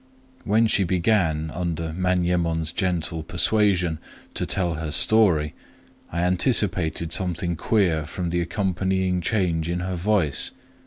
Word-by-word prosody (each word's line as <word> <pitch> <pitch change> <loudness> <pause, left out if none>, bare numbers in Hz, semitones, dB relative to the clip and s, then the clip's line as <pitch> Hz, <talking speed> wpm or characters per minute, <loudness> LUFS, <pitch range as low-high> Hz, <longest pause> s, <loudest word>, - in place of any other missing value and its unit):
When 110 +2 +3
she 105 -3 +2
began, 85 -4 +1
under 85 -2 -3
Manyemon's 85 -3 0
gentle 85 -4 -2
persuasion, 90 -1 +1 0.3
to - - -1
tell 90 -3 +1
her 80 0 -4
story, 80 -3 +3 0.6
I 85 +1 -1
anticipated 90 -4 +1
something 90 -2 -2
queer 85 -4 +1
from 85 +1 -4
the 85 0 0
accompanying 95 0 -1
change 85 -5 0
in 90 0 -1
her 95 0 -3
voice. 90 -5 0
90 Hz, 120 wpm, -24 LUFS, 80-95 Hz, 0.6 s, When